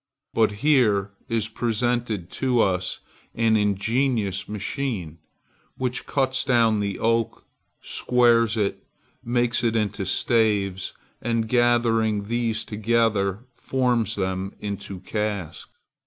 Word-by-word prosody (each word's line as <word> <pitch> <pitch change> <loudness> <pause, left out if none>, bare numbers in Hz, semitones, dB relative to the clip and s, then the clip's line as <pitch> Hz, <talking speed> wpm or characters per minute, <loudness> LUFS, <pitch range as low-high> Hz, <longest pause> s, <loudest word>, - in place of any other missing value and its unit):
But 110 -2 +3
here 105 -9 +3 0.2
is 115 -2 0
presented 115 -4 -1
to 130 -3 0
us 95 -3 0 0.3
an 115 -1 +3
ingenious 105 0 0
machine, 105 - -3 0.6
which 125 -1 -2
cuts 130 -2 +1
down 115 -4 +3
the 100 -1 -2
oak, 115 0 0 0.4
squares 115 -2 +3
it, 100 -2 -1 0.4
makes 120 0 +1
it 115 -1 +1
into 105 -3 -1
staves, 100 -2 +1 0.3
and, 115 -1 0
gathering 115 -3 +2
these 115 0 -1
together, 110 -1 0
forms 125 -2 0
them 95 0 -3
into 100 -2 -6
casks. 105 -4 -4
110 Hz, 105 wpm, -24 LUFS, 100-120 Hz, 0.6 s, But